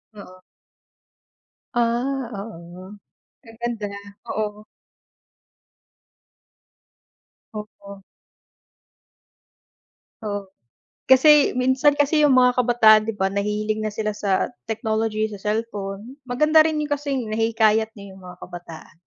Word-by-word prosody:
Oo. 185 -3 -13 1.3
Ah, 240 +2 0
oo. 185 -1 -10 0.5
Ang 225 -1 -15
ganda, 235 -3 -3 0.4
oo. 210 -1 -3 2.9
Totoo. 200 -2 -10 2.2
Oo, 205 -2 -4 0.6
kasi 290 +3 +6
minsan 260 +3 +3
kasi 300 +1 +3
'yung 290 - +5
mga 250 0 +4
kabataan 235 -3 +5
'di 225 +1 -3
ba 190 - +2
nahihilig 210 +2 -2
na 215 - -2
sila 210 0 -3
sa 200 -2 0 0.2
technology, 220 0 -1
sa 205 -2 -10
cellphone. 210 +1 -4
Maganda 305 +5 +4
rin 310 -1 -1
'yung 300 -1 -4
kasing 280 -4 -3
nahihikayat 220 0 +1
niyo 200 -1 -11
'yung 190 - -15
mga 180 0 -12
kabataan. 170 -2 -11
220 Hz, 100 wpm, -22 LUFS, 205-250 Hz, 2.9 s, kasi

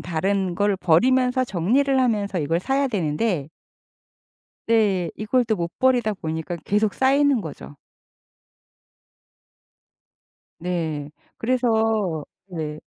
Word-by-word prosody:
다른 185 +2 -1
걸 200 +1 +1
버리면서 250 +9 +3
정리를 260 +9 +1
하면서 205 -6 0
이걸 165 +3 0
사야 275 +4 0
되는데 165 - -1 1.2
네, 200 -7 +2
이걸 230 +4 +1
또 220 -2 0
못 170 -1 -5
버리다 245 -4 +2
보니까 160 -2 -4
계속 210 +1 +1
쌓이는 275 -1 +3
거죠. 150 -3 -9 2.8
네. 160 -4 -3 0.3
그래서 250 +1 0 0.8
네. 155 -4 -5
200 Hz, 200 characters per minute, -23 LUFS, 170-250 Hz, 2.8 s, 버리면서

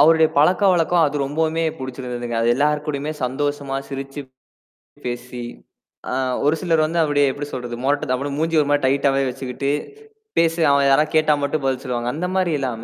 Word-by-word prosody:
அவருடைய 160 +1 +6
பழக்கவழக்கம் 175 0 +4
அது 145 0 -3
ரொம்பவுமே 160 +3 0
பிடிச்சிருந்ததுங்க. 125 -2 -5
அது 115 - +2
எல்லார்க்கூடயுமே 150 +1 0
சந்தோஷமா 140 +1 -2
சிரிச்சு 135 +1 -6 0.9
பேசி 120 0 -5 0.7
அ, - - -2 0.3
ஒருசிலர் 160 +2 +2
வந்து 165 +2 -1
அவருடைய 145 -2 +3
எப்பிடி 145 +2 -6
சொல்றது? 120 -2 -5
மொறட்டு 140 -1 +1
அப்பிடியே 140 +2 -2
மூஞ்ச 165 +2 -1
ஒருமாரி 145 0 +1
டைட்டாவே 135 0 +2
வச்சுக்கிட்டு 130 +1 -4 0.7
பேசு. 165 0 +2
அவன் 140 0 +3
யாரா 135 +2 +5
கேட்டா 155 -1 +4
மட்டும் 140 +1 -1
பதில் 130 -1 0
சொல்லுவாங்க. 120 -2 -2
அந்தமாரி 180 +2 -1
இல்லாம 120 -4 -3
145 Hz, 145 wpm, -21 LUFS, 130-155 Hz, 0.9 s, அவருடைய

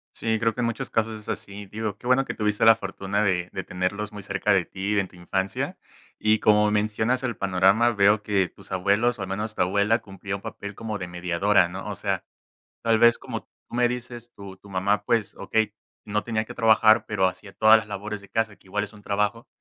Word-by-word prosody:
Sí, 110 -1 0
creo 115 -1 +1
que - - -9
en 120 - +1
muchos 115 - -3
casos 110 0 -1
es 105 - -12
así, 100 0 -6
digo, 105 0 -4
qué 120 - -17
bueno 125 +2 +3
que - - -4
tuviste 105 0 0
la 115 - +9
fortuna 100 0 -2
de 90 -2 0
de 95 - -3
tenerlos 100 +4 -3
muy 105 -1 -8
cerca 105 0 +1
de 90 -3 +2
ti 100 +2 -1
en 95 - -1
tu 90 - -19
infancia, 95 +2 -3 0.4
y 110 0 +3
como 105 0 +4
mencionas 110 +4 0
el 120 -6 -2
panorama 100 +5 +3
veo 100 +1 +4
que 100 -3 +1
tus - - -12
abuelos, 105 +6 +2
o - - -5
al 95 - -4
menos 105 +3 -3
tu - - -1
abuela 100 +5 +2
cumplía 95 -1 -6
un 100 - -8
papel 100 0 -7
como 110 -1 -4
de 90 -3 -5
mediadora, 90 +2 +2
¿no? 95 +2 -7
O - - -4
sea, - - -2 0.6
tal 115 -1 +3
vez 120 0 +6
como - - -6
tú - - -39 0.2
me 120 0 +3
dices, 120 -1 -6
tu 100 -1 -10
tu 100 - -17
mamá, 100 +2 0
pues, 110 0 0
okey, 110 -2 0 0.3
no 105 0 -1
tenía 110 -2 -1
que - - -9
trabajar, 110 -1 +5
pero 95 -3 +2
hacía 100 +1 -7
todas 110 +2 +6
las 110 - -9
labores 105 0 -5
de 100 - -16
casa, 110 -2 -1
que - - -24
igual 105 +2 -1
es 105 - -8
un 105 - -14
trabajo. 105 +5 -1
105 Hz, 230 wpm, -25 LUFS, 100-110 Hz, 0.6 s, la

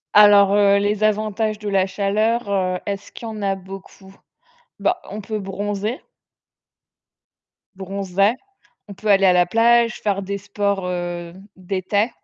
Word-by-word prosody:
Alors, 205 -1 +7
heu, 200 -1 +4
les 205 +1 0
avantages 215 0 0
de 210 -1 -5
la 195 -1 +2
chaleur, 210 +4 0
heu, 185 -2 0
est-ce 200 -1 -5
qu'il 230 - -9
y - - -5
en 215 -1 -7
a 195 -1 0
beaucoup? 190 0 -12 0.6
Ben, - - +1 0.2
on 210 +1 -6
peut 215 +2 -4
bronzer 205 +3 -4 1.7
bronzer. 195 +3 0 0.5
On 200 - -9
peut 215 +3 -6
aller 195 -1 +5
à 185 - +6
la 180 0 +3
plage, 230 +3 +3
faire 200 -2 -1
des 200 +1 -4
sports, 200 -1 -2
heu, 175 -1 -4 0.2
d'été, 195 +4 -1
200 Hz, 145 wpm, -21 LUFS, 190-210 Hz, 1.7 s, Alors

